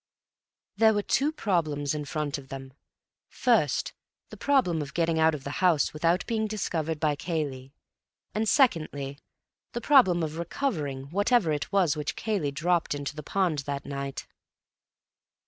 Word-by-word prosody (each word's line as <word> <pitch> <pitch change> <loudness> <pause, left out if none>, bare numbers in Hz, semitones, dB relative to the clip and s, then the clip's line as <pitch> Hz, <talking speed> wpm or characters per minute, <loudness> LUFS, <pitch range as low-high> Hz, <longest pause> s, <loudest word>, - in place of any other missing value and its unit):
There 220 -1 +5
were 205 - 0
two 285 +8 +1
problems 155 - -1
in 150 -1 -4
front 145 0 -3
of 135 -1 -14
them: 135 -1 -8 0.6
first, - - +1 0.4
the - - -9
problem 250 - +2
of 140 -2 -7
getting 165 -1 +1
out 160 0 +4
of 140 - -8
the 140 - -5
house 175 -6 +3
without 165 +3 +1
being 220 -2 -1
discovered 165 -7 -2
by 150 -1 +1
Cayley, 140 -5 -4 0.6
and 215 0 0
secondly, 145 - +1 0.5
the 240 - -3
problem 190 - +5
of 160 +1 -4
recovering 150 - -3
whatever 205 -1 +2
it 150 0 -2
was 185 -6 +3
which 150 -1 -3
Cayley 205 -10 -1
dropped 165 +3 0
into 145 +1 -5
the 150 - -6
pond 175 -1 0
that 140 -1 -3
night. 140 -1 -5
160 Hz, 150 wpm, -27 LUFS, 145-195 Hz, 0.6 s, There